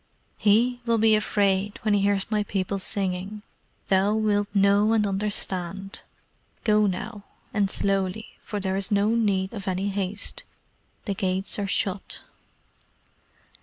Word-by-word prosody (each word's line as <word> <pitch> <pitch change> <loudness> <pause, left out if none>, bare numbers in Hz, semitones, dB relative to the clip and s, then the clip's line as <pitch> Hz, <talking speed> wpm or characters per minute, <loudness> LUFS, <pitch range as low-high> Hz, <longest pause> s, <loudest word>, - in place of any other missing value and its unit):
"HE 235 +4 +3
will 230 -1 +2
be 220 0 +5
afraid 200 -1 +1
when 215 -1 +2
he 205 - +3
hears 200 +1 +1
my 210 -1 +2
people 195 -1 -2
singing. 195 +2 -2 0.5
Thou 195 +2 +3
wilt 205 -2 +1
know 200 +2 +4
and 215 -2 +3
understand. 195 -1 -3 0.6
Go 210 -1 +4
now, 200 +3 -4 0.3
and 205 -2 +2
slowly, 195 +2 -1
for 205 - -4
there 190 -1 -1
is 195 +1 -2
no 205 0 +3
need 200 -4 +1
of 200 -4 -7
any 190 +2 0
haste. 200 +1 -3 0.6
The 200 - -1
gates 190 +1 -1
are 200 - -1
shut." 190 0 -2
200 Hz, 135 wpm, -25 LUFS, 195-210 Hz, 0.6 s, be